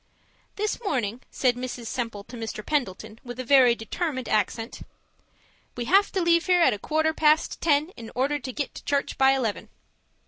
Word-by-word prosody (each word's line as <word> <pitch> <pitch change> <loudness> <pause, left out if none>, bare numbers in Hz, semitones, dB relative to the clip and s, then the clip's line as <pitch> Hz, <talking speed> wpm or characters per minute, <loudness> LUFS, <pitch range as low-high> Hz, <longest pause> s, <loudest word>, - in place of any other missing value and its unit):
This 425 +3 -2
morning, 250 - -1
said 250 -2 +1
Mrs. 245 -1 -6
Semple 230 -3 -4
to 230 +4 -12
Mr. 225 -2 -6
Pendleton, 225 -6 -2
with 245 0 -8
a - - -2
very 255 -2 +5
determined 260 +3 -3
accent: 220 +2 -1 0.9
'We 240 - -3
have 390 +9 +4
to 375 - +1
leave 335 0 +3
here 360 -2 +5
at - - +5
a 205 - -5
quarter 315 +6 0
past 310 0 +2
ten 300 0 +2
in 230 -11 -11
order 280 +4 0
to 260 -1 -6
get 285 +2 -4
to - - -10
church 280 -1 -1
by 270 0 +6
eleven.' 235 -6 -2
260 Hz, 180 wpm, -25 LUFS, 230-310 Hz, 0.9 s, by